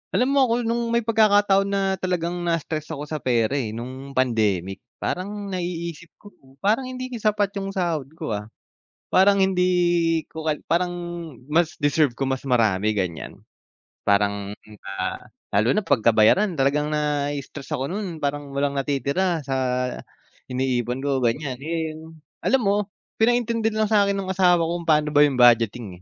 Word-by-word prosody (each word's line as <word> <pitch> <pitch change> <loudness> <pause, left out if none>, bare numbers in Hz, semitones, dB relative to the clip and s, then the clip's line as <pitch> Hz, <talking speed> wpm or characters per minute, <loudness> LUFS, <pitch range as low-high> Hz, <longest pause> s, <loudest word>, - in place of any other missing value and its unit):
Alam 255 +3 +2
mo 280 - +3
ako 230 - +1
nung 235 +1 -1
may 235 0 +1
pagkakataon 205 -3 +4
na 200 0 0 0.2
talagang 175 -1 -2
nai-stress 165 -2 -2
ako 145 - -6
sa 155 0 -5
pera 120 -3 +1
eh 110 -4 -4
nung 130 +4 -8
pandemic, 105 -7 0 0.2
parang 200 +2 -3
naiisip 170 -2 -4
ko 205 - -16 0.3
parang 225 +6 +2
hindi 255 0 -6
din 240 - -5
sapat 210 -2 +1
yung 195 +1 -5
sahod 170 -7 -1
ko, 155 -7 -5
ah. 105 0 -3 0.7
Parang 195 +1 +5
hindi 175 -3 +2
ko 160 0 -4
ko 150 - +1
parang, 180 +1 +1 0.6
mas 170 +1 +2
deserve 145 -3 +1
ko 135 - -1
mas 130 +1 -3
marami 110 -4 +2
ganyan 90 -6 -3 0.7
parang, 100 0 +1 0.5
ah, - - -2 0.3
lalo 110 +5 +3
na 215 - +1
pagka 120 -5 +3
bayaran 155 - +4
talagang 145 +2 +1
nai-stress 145 -2 -2
ako 130 - -2
nun 195 -5 -4
parang 145 -1 -3
walang 140 +1 -1
natitira 140 +4 -1
sa 135 - -2 1.0
iniipon 125 0 -1
ko 140 -2 +1
ganyan 125 +2 -1
and 160 0 -5 0.3
alam 265 0 +2
mo 200 - +3 0.5
pinaintindi 230 -1 +2
na 215 0 0
lang 215 - -6
sakin 200 -1 +3
ng 190 -1 -3
asawa 180 -2 +4
ko 170 +1 -2
kung 165 - -12
paano 150 -1 +3
ba 145 - +6
yung 145 -3 +4
budgeting 115 -6 +3
155 Hz, 160 wpm, -23 LUFS, 130-195 Hz, 1.0 s, ba